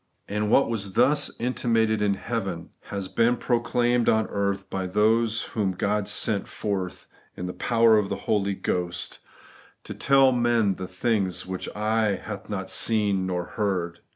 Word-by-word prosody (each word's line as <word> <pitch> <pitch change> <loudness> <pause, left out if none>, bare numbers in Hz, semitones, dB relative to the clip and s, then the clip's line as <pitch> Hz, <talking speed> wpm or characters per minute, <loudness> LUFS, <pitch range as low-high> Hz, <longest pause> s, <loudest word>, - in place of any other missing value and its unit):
And 105 +1 -1
what 135 - +4
was 100 -4 -3
thus 145 +6 +3
inti 125 0 -2
mated 110 -2 +2
in 100 -1 +2
heaven 95 -6 -4
has 100 -2 -4
been 115 +4 +2
proclaimed 120 0 +1
on 110 0 +3
earth 100 -1 -1
by 95 -1 -3
those 110 +3 +2
whom 100 -4 0
God 105 +2 -1
sent 105 -3 0
forth 95 -3 -4 0.3
in 90 - -4
the 90 - -4
power 115 -2 +4
of 100 -2 -2
the - - -1
Holy 100 -2 +1
Ghost, 90 -2 -3 0.6
to - - -7
tell 135 -1 +4
to 125 - 0
men 120 -4 +2
the 95 - -6
things 95 -1 -1
which 95 0 -5
eye 110 -1 +1
had 100 +2 -8
not 95 -2 -4
seen 100 -4 +1
nor 90 -1 -1
ear 85 - -13
heard. 90 -5 -1
105 Hz, 170 wpm, -25 LUFS, 95-115 Hz, 0.6 s, what